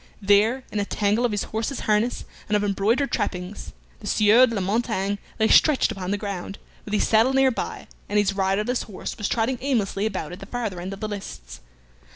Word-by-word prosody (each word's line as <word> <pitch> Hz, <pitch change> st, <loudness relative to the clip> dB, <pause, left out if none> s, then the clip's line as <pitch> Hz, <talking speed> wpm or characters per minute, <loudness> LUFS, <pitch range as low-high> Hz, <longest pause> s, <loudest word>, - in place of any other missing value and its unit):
There, 210 Hz, +6 st, +3 dB
in 210 Hz, -, -2 dB
a 200 Hz, -, 0 dB
tangle 210 Hz, +4 st, +1 dB
of 240 Hz, -, +1 dB
his 205 Hz, -1 st, -1 dB
horse's 225 Hz, +5 st, -3 dB
harness 215 Hz, +3 st, 0 dB, 0.2 s
and 210 Hz, -, +3 dB
of 205 Hz, -, -1 dB
embroidered 210 Hz, +7 st, +1 dB
trappings, 180 Hz, +2 st, -3 dB, 0.3 s
the 205 Hz, -, -9 dB
Sieur 215 Hz, +5 st, +5 dB
de 230 Hz, -, -3 dB
la -, -, 0 dB
Montaigne 205 Hz, 0 st, -1 dB, 0.2 s
lay 220 Hz, -, +4 dB
stretched 300 Hz, +2 st, +5 dB
upon 185 Hz, -1 st, -5 dB
the 205 Hz, -, 0 dB
ground, 200 Hz, -2 st, -5 dB, 0.3 s
with 210 Hz, -, -2 dB
his -, -, +2 dB
saddle 225 Hz, +4 st, +4 dB
near 270 Hz, 0 st, +4 dB
by, -, -, -5 dB, 0.2 s
and 210 Hz, -, 0 dB
his 200 Hz, -1 st, +2 dB
riderless 200 Hz, +5 st, 0 dB
horse 200 Hz, -4 st, -6 dB
was 210 Hz, -, -3 dB
trotting 235 Hz, +2 st, 0 dB
aimlessly 215 Hz, -6 st, 0 dB
about 185 Hz, -7 st, -4 dB
at 180 Hz, -, -8 dB
the 195 Hz, -, -10 dB
farther 215 Hz, -7 st, -4 dB
end 185 Hz, +2 st, -5 dB
of 195 Hz, -, -10 dB
the 215 Hz, -, -2 dB
lists. 195 Hz, -, -8 dB
210 Hz, 205 wpm, -24 LUFS, 195-230 Hz, 0.3 s, Sieur